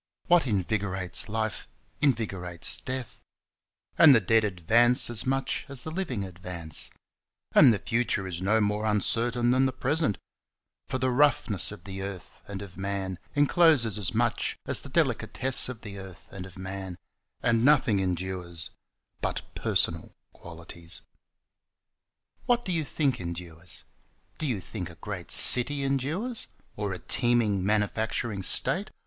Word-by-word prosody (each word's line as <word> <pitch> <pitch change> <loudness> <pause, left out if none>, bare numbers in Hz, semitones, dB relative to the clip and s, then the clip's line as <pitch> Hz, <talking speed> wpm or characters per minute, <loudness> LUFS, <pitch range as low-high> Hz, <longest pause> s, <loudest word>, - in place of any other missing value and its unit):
What 175 -4 +3
invigorates 95 -3 -1
life 110 0 -3 0.3
invigorates 100 - 0
death, 130 -3 -6 0.8
And 155 -5 +9
the - - +5
dead 110 +2 +2
advance 115 +6 +2
as 120 +1 0
much 135 0 -1
as 135 -3 -4
the 160 - -6
living 155 - -3
advance, 85 -3 -5 0.6
And 125 - +7
the 110 - +1
future 115 -1 -1
is 90 -2 -6
no 105 +4 +2
more 105 +1 -1
uncertain 115 +3 +1
than 130 +1 +3
the - - -2
present, 130 -1 0 0.7
For 130 - -2
the 130 0 0
roughness 125 - +3
of 105 -4 -11
the 95 -1 -7
earth 95 -2 -8
and 100 -1 -6
of 90 -3 -12
man 95 -2 -4 0.2
encloses 145 - +3
as 95 - -2
much - - 0
as - - +2
the - - -11
delicatesse 130 0 +3
of 120 -3 -8
the 100 -2 -8
earth 95 -1 -11
and 95 -1 -8
of 95 - -15
man, 95 -1 -6 0.5
And 115 -1 +2
nothing 125 -7 +3
endures 90 -2 -4 0.5
but - - -3
personal - - 0 0.2
qualities. 85 0 -10 1.5
What 240 -1 +1
do 185 - -3
you 165 -3 0
think 140 - -1
endures? 85 -1 -8 0.6
Do 155 - -2
you 115 -8 -2
think 90 0 -7
a 85 - -12
great 90 +1 -7
city 140 +3 +7
endures? 155 - -2 0.3
Or 105 -1 -3
a 90 - -4
teeming 115 -4 +1
manufacturing 105 +1 -1
state? 185 - +2
105 Hz, 140 wpm, -27 LUFS, 95-130 Hz, 1.5 s, And